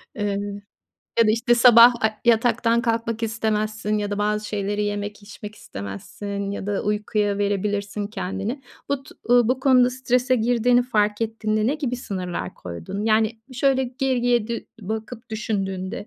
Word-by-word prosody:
eee, 205 -1 -1 0.8
ya 230 - +6
da - - +4
işte 240 +2 +3
sabah, 240 0 +8
aaa, 220 -1 0
yataktan 235 0 +3
kalkmak 230 -1 -1
istemezsin 215 -1 -1
ya 205 0 -2
da 205 - -2
bazı 210 0 0
şeyleri 205 0 -1
yemek 205 0 -4
içmek 210 +1 -10
istemezsin 200 - -6
ya 200 0 -5
da 205 -1 -1
uykuya 210 -1 0
verebilirsin 205 0 -1
kendini. 205 +6 -4 0.3
Bu 280 -1 -1
tu - - -15
uuu, 245 -1 +4
bu 260 +1 +1
konuda 255 -2 +5
strese 255 0 +1
girdiğini 245 +1 +3
fark 210 -3 0
ettiğinde 215 -1 -1
ne 280 - +2
gibi 265 -5 -2
sınırlar 185 -7 -5
koydun? 85 - -6
Yani, 220 0 +2
şöyle 265 +1 +2
geriye 245 -3 0
dü 235 - -4
bakıp 220 +3 -6
düşündüğünde 195 -2 -3
215 Hz, 150 wpm, -23 LUFS, 205-240 Hz, 0.8 s, sabah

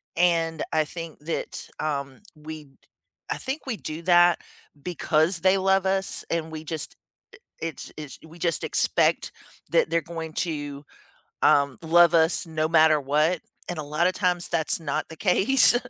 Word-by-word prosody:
and 165 -2 +1
I 155 -1 +2
think 165 0 -8
that, 165 - -4
um, 140 -3 -3
we 155 0 -9 0.6
I - - -2
think 270 +4 -5
we 250 -5 -3
do 155 -2 -6
that 175 0 +5 0.4
because 170 0 +1
they 185 +3 +3
love 190 0 +2
us, 190 0 0
and 160 -1 -2
we 155 -1 -7
just, 160 -1 -5 0.7
it 165 -1 -6
it's, 150 -4 -8
we 165 +2 -15
just 170 0 -1
expect - - +1 0.4
that - - +3
they're 170 - +1
going 160 0 -7
to, 145 -4 -4 0.6
um, 140 -2 +4
love 170 +1 +5
us 165 +1 +3
no 155 -1 -1
matter 155 -2 +5
what, 150 +5 +1 0.3
and 175 - -4
a - - -3
lotta 150 +5 +1
times 180 -1 0
that's 165 -1 +2
not 165 - -2
the 160 - -10
case. 215 +8 +5
165 Hz, 155 wpm, -25 LUFS, 155-175 Hz, 0.7 s, that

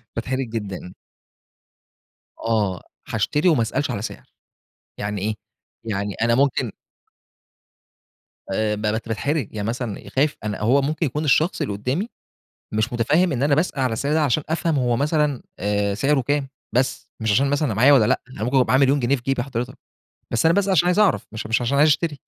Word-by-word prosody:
باتحرج 130 +2 -2
جدًا. 100 -5 -5 1.5
آه، 105 -5 0 0.3
هاشتري 150 +5 +1
وما 150 -9 +4
أسألش 120 +5 -1
على 105 -4 -3
سعر 110 - -8 0.7
يعني 105 0 -3
إيه، 110 +3 -1 0.5
يعني 100 -2 -2
أنا 115 +1 +3
ممكن 135 +2 +1 1.8
آآ، 105 +2 0
باتحرج 110 +5 -1
يعني 105 0 -3
مثلًا 120 -3 -4
خايف 145 +2 +2
أنا 105 -1 -3
هو 120 +7 +3
ممكن 155 +3 0
يكون 150 +3 -2
الشخص 155 +5 +2
اللي 105 - -1
قدّامي 130 - -2 0.7
مش 110 +3 0
متفهم 150 +10 +2
إن 130 -1 -1
أنا 145 0 +4
باسأل 155 -2 0
على 130 -3 +1
السعر 140 +6 -1
ده 155 0 +3
عشان 145 +2 +1
أفهم 160 0 0
هو 120 -2 +1
مثلًا 150 -1 +1 0.2
آآ، 100 0 0
سعره 140 +6 +2
كام 140 +2 -1 0.3
بس 125 -1 0
مش 110 - +1
عشان 135 +6 +3
مثلًا 145 +2 +1
أنا 115 - -1
معايا 125 +7 +6
والّا 130 -6 +6
لأ، - - +2
أنا 110 - -5
ممكن 125 +4 0
يكون 130 - +4
معايا 130 - +3
1.000.000 140 +1 +4
جنيه 130 +3 +2
في 120 - -11
جيبي 135 -1 0
حضرتك، 125 -2 -5 0.5
بس 115 +4 +1
أنا 165 - +5
باسأل 200 -1 +2
عشان 175 -2 +4
عايز 180 +3 +2
أعرف 210 -3 +3
مش 110 -1 -6
مش 115 +2 +1
عشان 120 +4 0
عايز 150 +2 +6
اشتري 150 -1 0
130 Hz, 185 wpm, -22 LUFS, 110-145 Hz, 1.8 s, معايا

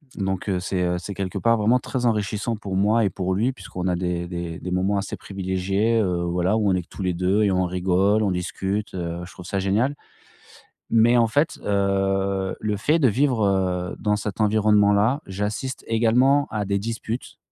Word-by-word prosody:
donc 95 -1 -3
heu, 90 -2 0
c'est, 90 0 -2
heu, 90 0 0
c'est 100 +3 -6
quelque 95 +1 -4
part, 115 +3 +3
vraiment 115 +4 +3
très 125 0 -3
enrichissant 105 0 0
pour 100 -2 -5
moi 105 +4 +3
et - - +2
pour 95 +1 -2
lui 115 +7 +1
puisqu'on 90 -7 -6
a 90 - +1
des 85 -1 -2
des 85 -1 -5
des 90 - -6
moments 95 +3 +1
assez 100 - -4
privilégiés, 95 +4 -1
heu, 90 -3 0
voilà, 90 +4 0
où 105 -3 +2
on 95 - +3
est 90 - -1
que - - -27
tous - - -9
les 90 - 0
2 95 +5 +1
et 100 - +3
on 95 0 +1
rigole, 95 +4 +2
on 100 - +1
discute, 95 +3 -3
heu, 85 -1 -4
je 95 - -12
trouve 90 - -11
ça 100 +1 -3
génial. 110 +9 +1 0.9
Mais 115 +2 +4
en 115 - +4
fait, 145 +7 +1
heu, 95 -1 0
le 105 -1 -1
fait 150 +10 +2
de 135 - +4
vivre, 120 -1 +2
heu, 90 -2 0
dans 105 -1 +1
cet 105 0 -4
environnement-là, 105 +4 +3
j'assiste 105 +7 -4
également 125 +5 +3
à 105 -1 -2
des 100 0 0
disputes, 115 +2 -5
100 Hz, 200 wpm, -23 LUFS, 95-110 Hz, 0.9 s, Mais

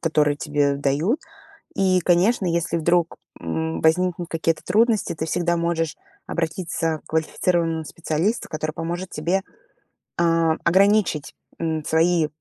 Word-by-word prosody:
которые 150 -3 +2
тебе 145 -2 0
дают. 145 - 0 0.5
И 185 -2 +2
конечно, 180 +4 +2
если 170 0 0
вдруг, 170 +1 +1 0.2
м, 160 0 -3
возникнут 175 +1 +2
какие-то 165 0 -1
трудности, 220 0 +2
ты 160 +1 -4
всегда 175 +1 0
можешь 170 -2 -1 0.3
обратиться 165 -1 -2
к - - -16
квалифицированному 165 0 0
специалисту, 165 +8 -2
который 155 0 -3
поможет 175 +3 -4
тебе, 175 +6 -1 0.8
а, 165 -1 +3
ограничить, 190 -4 +2 0.2
м, 160 -2 -2
свои, 165 0 +2
165 Hz, 120 wpm, -23 LUFS, 160-180 Hz, 0.8 s, а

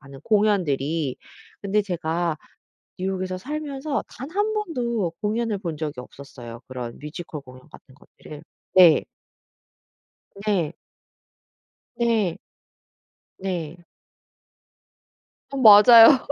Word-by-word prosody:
하는 135 -1 -13
공연들이. 165 - 0 0.5
근데 205 +1 +1
제가 170 -3 -2 0.6
뉴욕에서 185 0 -3
살면서 285 +3 -4
단 265 - -9
1 415 +3 0
번도 240 - -2
공연을 215 -1 -1
본 170 -5 -5
적이 150 -4 -5
없었어요, 125 -3 -11
그런 125 -2 -7
뮤지컬 150 0 -8
공연 130 +2 -16
같은 130 - -17
것들을. 150 +1 -14 0.3
네. 175 -4 +7 1.4
네. 175 -7 0 1.2
네. 225 -8 0 1.0
네. 175 -3 -5 1.7
어 275 - -6
맞아요. 230 +2 +8
185 Hz, 185 characters per minute, -23 LUFS, 150-225 Hz, 1.7 s, 맞아요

